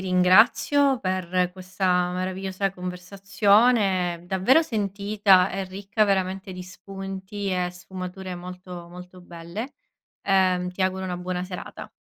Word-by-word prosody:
ringrazio 220 +9 +4
per 185 -2 -1
questa 185 -1 0
meravigliosa 190 +1 -3
conversazione, 195 0 +1
davvero 190 - +4
sentita, 200 - +2
e 195 +1 -3
ricca 195 +3 -2
veramente 190 -1 -1
di 180 0 -8
spunti, 195 +2 -7
e 180 -1 -1
sfumature 185 +1 -7
molto, 180 -1 -9
molto 180 +1 -12
belle. 175 +9 -8 0.5
Ehm, 185 -2 +2
ti 185 - -2
auguro 190 0 -1
una 180 -1 -3
buona 180 0 -3
serata. 180 -1 -8
185 Hz, 115 wpm, -24 LUFS, 180-195 Hz, 0.5 s, ringrazio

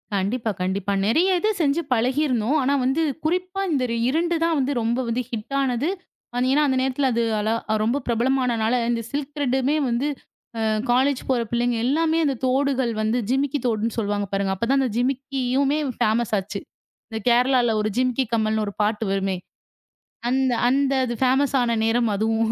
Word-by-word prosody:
கண்டிப்பா, 220 +4 -1
கண்டிப்பா. 190 +2 -1
நெறைய 320 - +3
இது 425 - +1
செஞ்சு 295 +2 +2
பழகி 250 +5 +1
இருந்தோம். 250 +2 +1
ஆனா 270 +2 +1
வந்து 270 +5 +1 0.2
குறிப்பா 365 +3 -1
இந்த 275 -4 +1 0.3
2 340 +4 +1
தான் 330 -1 +2
வந்து 270 +1 0
ரொம்ப 230 +2 0 0.3
ஹிட் 230 +4 -5
ஆனது. 265 +3 0 0.6
ஏன்னா 290 +2 +3
அந்த 260 -1 +1
நேரத்துல 265 +1 0 0.3
அளா 215 +2 0 0.2
அது 215 - +1
ரொம்ப 235 +6 +1
பிரபலமானனால 240 -1 +1 0.2
அந்த 235 -1 0
சில்க் 290 0 -4
திரேட் 265 -2 0 0.2
வந்து 240 +4 0 0.8
காலேஜ் 260 +2 +2
போற 255 -2 +2
புள்ளைங்க 240 0 0
எல்லாமே 320 +4 +2
அந்தத் 275 -5 -1
தோடுகள் 260 -1 +1
வந்து 220 +3 +1
ஜிமிக்கி 275 +2 0
தோடுன்னு 225 -1 0
சொல்லுவாங்க 205 -2 -1
பாருங்க. 195 -1 0
அப்பத் 230 +5 -3
தான் 275 - +3
அந்த 260 - 0
ஜிமிக்கியுமே 270 +2 0 0.2
ஃபேமஸ் 220 +1 +1
ஆச்சு. 200 +1 -4 0.5
இந்தக் 220 -2 -6
கேரளாவுல 245 -1 +3
ஒரு 215 - 0
ஜிமிக்கி 255 +1 +1
கம்மல்னு 220 -1 +1
ஒரு 200 - -5
பாட்டு 210 +1 0
வருமே, 195 -1 0 0.9
அந்த 260 0 +2 0.2
அந்த 275 +2 +2 0.3
ஃபேமஸ் 265 +2 +2
ஆன 235 -1 +1
நேரம் 230 +1 +2
அதுவும். 220 +2 +1
250 Hz, 155 wpm, -23 LUFS, 225-275 Hz, 0.9 s, நெறைய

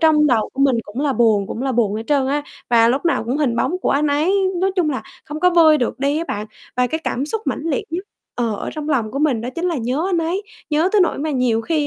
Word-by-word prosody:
trong 310 -2 +5
đầu 235 -6 +2
của 270 - -5
mình 270 -3 +4
cũng 210 +6 -6
là 285 -2 +1
buồn, 220 -5 +3
cũng 240 - -5
là 270 - 0
buồn 220 -4 +1
hết 220 - -3
trơn 280 -3 +2
á 290 +2 0 0.3
và 230 -1 +5
lúc 265 +6 0
nào 335 -8 +1
cũng 245 +4 -1
hình 275 -6 0
bóng 360 +9 0
của - - -1
anh 290 +2 +2
ấy 295 +5 +2 0.3
nói 385 +1 +2
chung 340 -5 +2
là, 265 - -3 0.2
không 300 +1 -6
có 360 - +5
vơi 320 -3 +6
được 245 - -2
đi 280 +3 +1
á 330 - -2
bạn. 210 +1 -3 0.3
Và 250 0 +3
cái 320 +5 -3
cảm 270 +4 -1
xúc 440 +8 -2
mãnh - - -2
liệt 315 -5 -1
nhất 360 +4 -3 0.3
ờ, 235 -3 0
ở - - -5
trong 305 -1 -5
lòng 240 -8 0
của 275 - -4
mình 285 -6 +1
đó 235 - -4
chính 340 - -3
là 350 -3 0
nhớ 255 +7 -1
anh 350 - +1
ấy, 335 +5 -1 0.3
nhớ 310 +4 +2
tới 420 - +4
nỗi 360 - +2
mà 310 +2 -2
nhiều 250 -5 +1
khi 300 +4 0
285 Hz, 290 wpm, -20 LUFS, 245-320 Hz, 0.3 s, vơi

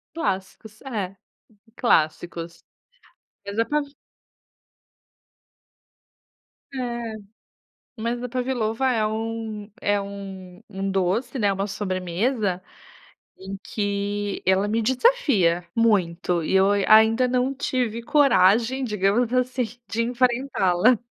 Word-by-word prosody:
Clássicos, 215 - -4
é, 205 -8 -4 0.6
clássicos. 170 -4 0 0.8
Mas 200 +2 -6
a 230 - +3
pav 300 0 0 2.9
É, - - -8 1.2
mas 235 +2 -2
a 250 - -4
Pavlova 250 -1 -1
é 220 -3 +1
um 220 -1 -4
é 205 0 +2
um 195 -2 -8
um 195 -1 -3
doce, 195 +8 0
né, 205 -3 +3
uma 195 +1 -2
sobremesa, 185 +1 -1 0.8
em 195 +1 -7
que 205 0 -2
ela 190 +2 +3
me 225 +2 0
desafia 235 - +2
muito 180 -6 +1
e - - -2
eu 190 +1 +5
ain 205 -1 +1
ainda 220 +3 +6
não 255 +2 0
tive 250 -4 -2
coragem 260 -3 +3
digamos 210 +1 +1
assim 255 0 +1 0.2
de 225 - -1
enfrentá-la. 245 -4 +2
215 Hz, 100 wpm, -24 LUFS, 195-245 Hz, 2.9 s, ainda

